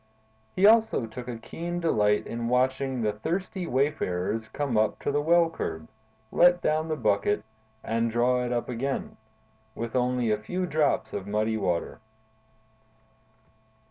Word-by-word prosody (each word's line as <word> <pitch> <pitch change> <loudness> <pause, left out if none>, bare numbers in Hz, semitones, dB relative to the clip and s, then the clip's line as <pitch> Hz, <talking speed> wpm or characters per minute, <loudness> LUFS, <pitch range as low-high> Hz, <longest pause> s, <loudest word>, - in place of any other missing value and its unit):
He 190 - +4
also 220 - +5
took 120 +2 -8
a 120 -2 -4
keen 170 +9 -5
delight 105 -11 +2
in 115 0 -4
watching 130 0 +1
the 105 -1 +1
thirsty 175 - -3
wayfarers 110 -6 -1
come 140 0 -3
up 110 -1 +2
to - - 0
the 145 +1 +1
well 170 +2 +4
curb, 80 - -5 0.4
let 175 0 +5
down 155 -1 0
the 155 - -1
bucket, 105 -4 +1 0.4
and 115 +1 0
draw 125 +2 +2
it 125 - -3
up 120 -1 -1
again, 130 +3 -3 0.6
with 115 +1 -5
only 125 -2 +1
a 105 - +1
few 180 +11 -2
drops 155 -4 0
of 100 -1 -4
muddy 110 +2 0
water. 90 -5 -2
125 Hz, 145 wpm, -27 LUFS, 110-155 Hz, 0.6 s, also